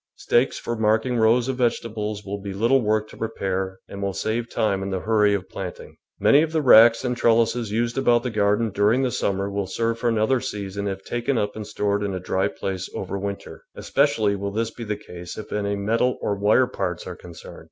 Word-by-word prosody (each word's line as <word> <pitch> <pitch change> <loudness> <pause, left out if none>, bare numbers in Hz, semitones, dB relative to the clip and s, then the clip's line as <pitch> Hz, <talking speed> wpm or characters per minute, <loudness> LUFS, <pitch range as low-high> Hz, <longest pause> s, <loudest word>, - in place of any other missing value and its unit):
Stakes 120 +3 +1
for 120 - -4
marking 110 +3 +1
rows 115 +2 +3
of 130 -1 -2
vege 120 -2 +2
tables 105 -2 -5
will 100 0 -5
be 100 -1 -5
little 120 +6 +3
work 110 -1 0
to - - -13
prepare 95 -4 -3
and 100 - -8
will 100 -1 -1
save 115 +2 -2
time 100 -3 0
in 95 - -3
the 95 -1 -2
hurry 105 -1 +3
of 95 -1 -5
planting. 90 -2 -8 0.2
Many 145 - +5
of 160 0 -1
the 160 -2 0
racks 115 -1 +7
and 125 0 0
trellises 115 -1 +2
used 115 +3 0
about 120 -3 +3
the 125 - -2
garden 105 +1 +1
during 105 +6 +2
the 130 - 0
summer 100 -2 -1
will 100 -1 -3
serve 115 +4 -1
for 120 - +1
another 115 +3 +2
season 100 -2 -4
if 95 0 -4
taken 120 +2 -1
up 105 -2 -1
and 110 -1 -6
stored 100 -1 -1
in 100 -2 -2
a - - -3
dry 95 +2 0
place 95 +3 -4
over 100 +1 -4
winter; 100 0 -6
especially 115 -8 +1
will 100 0 -3
this 115 +3 -2
be 120 - -8
the 105 -2 -3
case 90 -4 -9
if 110 - -8
any 100 -1 -1
metal 115 +5 0
or 105 - -1
wire 105 +5 +3
parts 90 -7 -4
are 90 - -6
concerned. 85 -2 -12
105 Hz, 220 wpm, -23 LUFS, 100-115 Hz, 0.2 s, racks